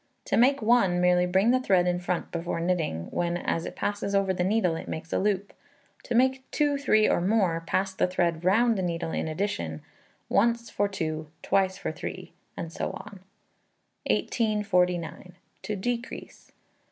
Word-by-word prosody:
To - - 0
make 260 +2 +4
one, 215 -6 +4
merely 180 0 +3
bring 190 +6 +3
the 255 - +3
thread 190 -8 +3
in 180 0 +1
front 180 -1 -3
before 170 0 -3
knitting, 165 - -1
when, 175 0 -1
as 165 -1 -2
it - - -8
passes 205 -1 -2
over 195 -1 +2
the 180 - -1
needle, 185 -3 +2
it - - -7
makes 160 +1 -5
a - - +2
loop; 200 0 -1 0.5
to 240 - -2
make 260 +2 +3
two, 290 -1 +1
three, 215 -6 +4
or - - +2
more, 185 -4 +1
pass 195 0 0
the 190 - +1
thread 175 -2 0
round 220 +4 +3
the - - 0
needle 170 -2 -2
in - - -2
addition, 155 - -3 0.4
once 235 +2 +1
for 205 - +1
2, 155 -5 -3 0.2
twice 190 -1 +1
for 195 - -3
3, 155 - -7 0.2
and 165 0 -5
so - - -2
on. 205 -2 -9 0.9
1849. 180 -6 0 0.3
To 210 - -3
Decrease. 240 +5 -5
190 Hz, 170 wpm, -27 LUFS, 175-215 Hz, 0.9 s, make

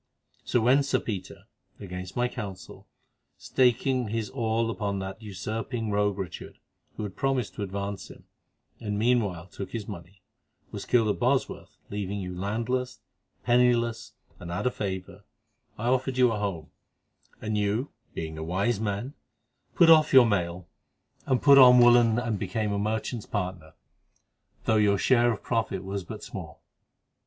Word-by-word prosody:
So 120 - +1
when 130 +5 +4
Sir 135 -2 +1
Peter—against 95 -2 -8
my 125 0 +1
counsel, 100 -6 -8 0.5
staking 125 0 +1
his 110 0 -3
all 115 -2 0
upon 100 -3 -2
that 95 +3 -6
usurping 110 +3 -4
rogue 105 -1 +1
Richard, 95 -4 -7 0.4
who - - -4
had 100 -3 -6
promised 130 - -1
to - - -7
advance 100 0 -4
him, - - -14 0.6
and 105 -2 -3
meanwhile 105 -7 +1
took 95 +1 -8
his 110 -3 -4
money—was 90 -1 -11
killed 115 -3 +3
at 105 - -1
Bosworth, 130 +2 -1
leaving 100 0 -3
you 90 -1 -5
landless, 115 +7 -2 0.4
penniless, 120 -1 +2 0.3
and 85 - -8
out 85 +8 -3
of 125 - +1
favour, 95 0 -5 0.5
I 110 - -5
offered 130 0 0
you 125 -2 +5
a 110 - -2
home, 95 -7 -4 0.7
and 110 0 -3
you, 105 +6 0 0.2
being 80 -1 -5
a - - -4
wise 95 +7 0
man, 105 +5 -3 0.6
put 170 -2 +7
off 155 -2 +6
your 130 -2 +9
mail 90 -4 -1 0.6
and 130 -2 +1
put 140 -1 +8
on 125 -1 +9
woollen 120 -2 +6
and 115 -4 -1
became 110 -1 -2
a 100 - -1
merchant's 110 +2 -2
partner, 90 -5 -4 0.9
though 110 - +3
your 100 -1 +3
share 120 +2 +3
of 110 - -5
profit 110 -5 -1
was 95 0 -4
but - - -9
small. - - -9
110 Hz, 150 wpm, -27 LUFS, 100-120 Hz, 0.9 s, your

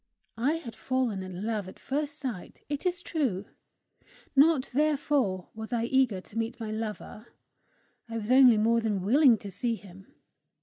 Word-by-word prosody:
I 270 +6 +2
had 290 -9 -6
fallen 255 -7 -1
in 185 +1 -6
love 215 -4 -2
at 190 - -11
first 290 +1 -3
sight, 250 -11 -6
it 290 +4 -2
is 355 -1 -1
true; 240 - -1 0.9
not 285 -1 +4
therefore 280 - +1
was 220 +1 -7
I 235 -2 0
eager 240 -6 +2
to 210 - -12
meet 225 +1 -3
my 220 -2 -4
lover. 215 +1 -6 0.8
I 230 - -4
was 220 +1 -3
only 255 -3 +7
more 230 +2 +3
than 210 -4 -1
willing 250 +3 +5
to 200 -1 -8
see 235 +4 -1
him. 195 -2 -14
230 Hz, 165 wpm, -28 LUFS, 210-270 Hz, 0.9 s, only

